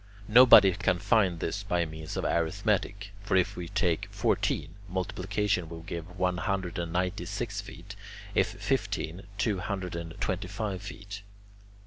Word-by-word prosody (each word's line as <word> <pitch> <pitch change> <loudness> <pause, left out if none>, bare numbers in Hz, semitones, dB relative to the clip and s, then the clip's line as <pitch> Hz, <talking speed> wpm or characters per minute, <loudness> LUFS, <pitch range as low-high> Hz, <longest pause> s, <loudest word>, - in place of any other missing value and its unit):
Nobody 115 -4 +9
can 95 -1 +1
find 95 -3 +2
this 95 +6 -2
by 90 -4 0
means 80 0 -7
of - - -2
arithmetic. 100 +3 0
For 100 -2 +1
if 90 - +1
we 90 -1 -5
take 90 -4 0
fourteen, 75 +3 0 0.2
multiplication 95 0 -1
will 80 -1 -8
give 85 +2 -7
one 90 0 +1
hundred 95 -2 -2
and 85 -1 -3
ninety 90 +1 -1
six 100 +1 -3
feet; 100 0 -11 0.4
if - - +3
fifteen, 90 +4 -2
two 105 -1 +1
hundred 95 -3 -3
and 85 -1 -6
twenty 95 +1 -1
five 100 -1 -3
feet. 100 0 -8
95 Hz, 150 wpm, -29 LUFS, 85-100 Hz, 0.4 s, Nobody